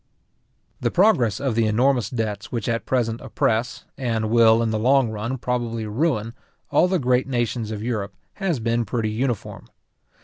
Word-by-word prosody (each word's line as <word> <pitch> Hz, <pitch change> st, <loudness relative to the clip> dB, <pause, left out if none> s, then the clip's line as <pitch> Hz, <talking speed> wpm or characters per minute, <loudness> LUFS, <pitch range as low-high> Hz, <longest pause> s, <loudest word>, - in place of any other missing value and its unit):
The -, -, 0 dB
progress 140 Hz, -, +3 dB
of 135 Hz, -4 st, -1 dB
the 115 Hz, 0 st, +2 dB
enormous 120 Hz, 0 st, +2 dB
debts 110 Hz, -2 st, -4 dB
which 115 Hz, -4 st, -3 dB
at 115 Hz, -1 st, -2 dB
present 120 Hz, -3 st, 0 dB
oppress, 115 Hz, +2 st, -1 dB
and 115 Hz, -4 st, -1 dB
will 115 Hz, -1 st, +5 dB
in 115 Hz, -, 0 dB
the 110 Hz, -, -1 dB
long 130 Hz, 0 st, +3 dB
run 115 Hz, +5 st, -3 dB
probably 120 Hz, -2 st, -2 dB
ruin, 115 Hz, -1 st, -1 dB, 0.4 s
all -, -, +4 dB
the 185 Hz, 0 st, +1 dB
great 125 Hz, -3 st, +1 dB
nations 120 Hz, -3 st, -1 dB
of 105 Hz, -1 st, -5 dB
Europe, 105 Hz, -5 st, -3 dB, 0.3 s
has 175 Hz, -8 st, 0 dB
been 115 Hz, +1 st, 0 dB
pretty 110 Hz, 0 st, -2 dB
uniform. 120 Hz, -1 st, -3 dB
115 Hz, 165 wpm, -23 LUFS, 110-125 Hz, 0.4 s, will